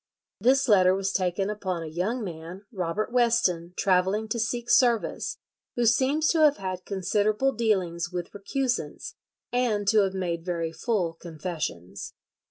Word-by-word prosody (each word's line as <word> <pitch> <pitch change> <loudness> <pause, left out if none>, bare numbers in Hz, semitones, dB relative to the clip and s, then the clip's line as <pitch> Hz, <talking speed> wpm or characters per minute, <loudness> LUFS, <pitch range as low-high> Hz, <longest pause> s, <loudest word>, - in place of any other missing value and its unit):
This 265 +6 +3
letter 185 -4 +5
was 195 0 -1
taken 190 +2 0
upon 185 -5 -3
a - - -6
young 185 +10 -2
man, 175 +2 -8
Robert 190 +2 -2
Weston, 190 -8 +2
travelling 190 +3 +2
to 235 - -1
seek 235 +1 -2
service, 240 -3 +2 0.4
"who 240 - +1
seems 270 +7 +3
to 330 - +2
have 300 -2 +5
had 185 -2 -5
considerable 210 +6 +1
dealings 185 -7 0
with 175 -1 -5
recusants, 240 +5 -3 0.4
and 230 -5 0
to 220 - +5
have 195 -2 +1
made 170 -3 -2
very 170 -2 -2
full 180 -3 -1
confessions." 155 - -6
195 Hz, 145 wpm, -26 LUFS, 175-235 Hz, 0.4 s, letter